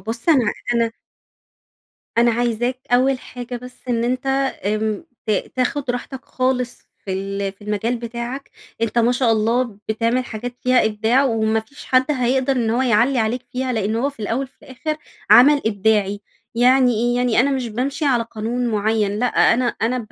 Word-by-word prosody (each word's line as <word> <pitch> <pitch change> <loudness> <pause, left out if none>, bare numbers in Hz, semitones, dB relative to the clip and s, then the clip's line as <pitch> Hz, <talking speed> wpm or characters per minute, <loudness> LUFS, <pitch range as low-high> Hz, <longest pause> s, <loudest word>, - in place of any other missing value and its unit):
بُص 225 - -6
أنا 255 -9 +4 0.2
أنا 230 -1 +2 1.3
أنا 235 0 +5
عايزاكَ 240 +2 -1
أول 255 +2 +3
حاجة 245 -1 -7
بس 250 +1 -11
إن 235 -1 +1
أنتَ 255 +2 -2 0.4
آمم 215 +5 -1 0.2
ت - - -1 0.3
تاخد 255 +1 0
راحتك 255 +2 -5
خالص 255 -1 -1 0.3
في 190 - -3
ال 195 +1 -3
في 205 +1 -17
المجال 215 +4 -1
بتاعك. 235 +3 -6 0.3
أنتَ 230 +1 0
ما 235 +2 +4
شاء 245 -2 +2
الله 225 0 0
بتعمل 230 +3 0
حاجات 240 +2 -6
فيها 255 -2 +4
إبداع 220 +5 +2
وما 220 -2 +1
فيش 285 +7 -14
حد 255 0 +4
هيقدر 260 0 +1
إن 230 -2 +1
هو 245 +3 +1
يعلّي 245 +2 +3
عليك 230 +3 0
فيها، 255 0 -2
لأن 220 0 -1
هو 275 +5 0
في 275 - -16
الأول 230 +6 -1
وفي 265 - -17
الآخر 295 +3 -4 0.3
عمل 280 +6 +7
إبداعي. 205 -1 +1 0.3
يعني 250 +1 +4
ايه؟ 240 +2 +1
يعني 245 -2 +2
أنا 280 - +2
مش 260 -4 -1
بامشي 265 +7 -2
على 250 -4 +3
قانون 235 +3 -2
معين 210 -1 0
لأ، 250 - +2
أنا 245 +1 +3 0.2
أنا 250 +3 +1
240 Hz, 170 wpm, -20 LUFS, 220-255 Hz, 1.3 s, عمل